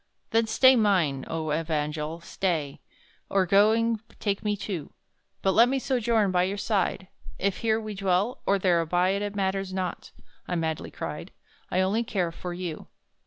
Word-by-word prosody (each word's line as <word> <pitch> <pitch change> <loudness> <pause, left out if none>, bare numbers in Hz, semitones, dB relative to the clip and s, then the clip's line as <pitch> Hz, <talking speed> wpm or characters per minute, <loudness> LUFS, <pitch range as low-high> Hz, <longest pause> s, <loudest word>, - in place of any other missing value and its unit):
"Then 225 0 +3
stay, 260 +4 +6
mine 180 - +2
own 160 -2 -2
evangel, 155 0 -2
stay! 170 -5 -2 0.5
Or, 195 -1 +2
going, 220 +4 +3 0.2
take 200 -1 -1
me 210 -1 0
too; 190 -6 -5 0.5
But 195 - +3
let 230 +5 +5
me 270 - +1
sojourn 235 -6 +1
by 180 -1 +3
your 190 +3 -1
side, 200 -2 -1 0.3
If 195 0 0
here 220 -1 +1
we 215 -1 -6
dwell 195 +4 0
or 200 - +4
there 180 -3 +3
abide, 180 +4 +1
It 205 0 -3
matters 195 -1 -1
not!" 185 -1 -4 0.4
I 180 - -2
madly 160 -2 -2
cried - - -6 0.4
"I 185 - +1
only 200 +5 +1
care 185 -6 -1
for 175 +1 -6
you." 175 -3 -5
190 Hz, 165 wpm, -27 LUFS, 175-210 Hz, 0.5 s, stay